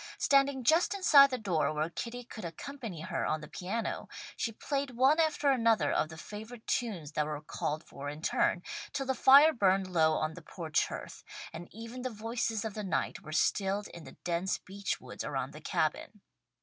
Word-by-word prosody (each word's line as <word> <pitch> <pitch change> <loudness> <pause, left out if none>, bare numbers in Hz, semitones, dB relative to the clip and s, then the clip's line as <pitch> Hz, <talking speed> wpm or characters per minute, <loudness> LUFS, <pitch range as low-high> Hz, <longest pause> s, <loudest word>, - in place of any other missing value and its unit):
Standing 275 -1 +3
just 325 - +4
inside 290 -8 +7
the 255 - -2
door 180 -10 0
where 155 +2 -1
Kitty 245 +6 -5
could 230 -3 -9
accompany 200 - -6
her 175 0 -2
on 155 - 0
the 150 - -8
piano, 200 +9 -4 0.3
she 230 - -2
played 275 +3 -3
one 270 +5 +5
after 310 -3 +3
another 230 - +3
of 155 - +1
the 160 - -10
favourite 220 +6 -9
tunes 190 - -2
that 150 - 0
were 150 -1 -3
called 150 +1 -3
for 140 +1 -7
in 150 +2 -8
turn, 175 - +1 0.3
till 270 -1 -2
the 265 - +1
fire 280 +5 +7
burned 195 -4 +3
low 160 -2 +4
on 155 0 -1
the 180 - -10
porch 160 -1 -1
hearth, - - -8 0.3
and 170 +1 -7
even 230 +4 -8
the 255 - -2
voices 225 0 -2
of 220 - -3
the 210 - -5
night 190 - -2
were 155 - -10
stilled 195 +5 +1
in 170 - -10
the - - -13
dense 175 +2 0
beech 200 +2 -4
woods - - -7
around - - -3
the - - -10
Cabin. - - -2
210 Hz, 195 wpm, -31 LUFS, 165-255 Hz, 0.3 s, inside